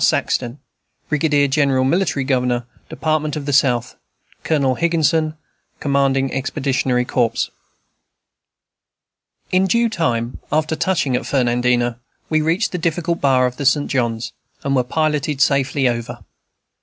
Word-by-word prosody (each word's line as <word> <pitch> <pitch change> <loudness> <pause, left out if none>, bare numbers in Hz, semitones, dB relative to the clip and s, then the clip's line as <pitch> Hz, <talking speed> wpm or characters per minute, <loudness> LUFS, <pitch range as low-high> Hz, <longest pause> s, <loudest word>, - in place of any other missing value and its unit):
SAXTON, 120 +1 +1 0.5
Brig. 150 +1 +1 0.2
Gen., 140 0 +3
Mil. 130 -1 +2
Gov. 130 -6 +1 0.3
Dept. 155 -1 -1
of 150 -2 -5
the 145 - -2
South. 125 -3 +2 0.5
Colonel 140 -5 +1
Higginson, 160 0 +1 0.4
Comdg. 135 -1 +1
Expeditionary 130 -2 -1
Corps. 120 -2 0 2.0
In 185 +1 +3
due 235 +4 +2
time, 120 - -1
after 155 +1 +1
touching 155 -8 0
at - - -3
Fernandina, 120 -2 +1 0.3
we 155 0 +3
reached 165 +7 0
the 180 - -3
difficult 170 +1 -1
bar 130 -2 +3
of 125 0 -3
the 140 - -4
St. 145 +1 +2
John's, 120 -3 -1 0.3
and 140 0 0
were 125 - +3
piloted 150 0 -1
safely 140 -1 +2
over. 120 -1 -4
140 Hz, 125 wpm, -19 LUFS, 125-155 Hz, 2.0 s, Gen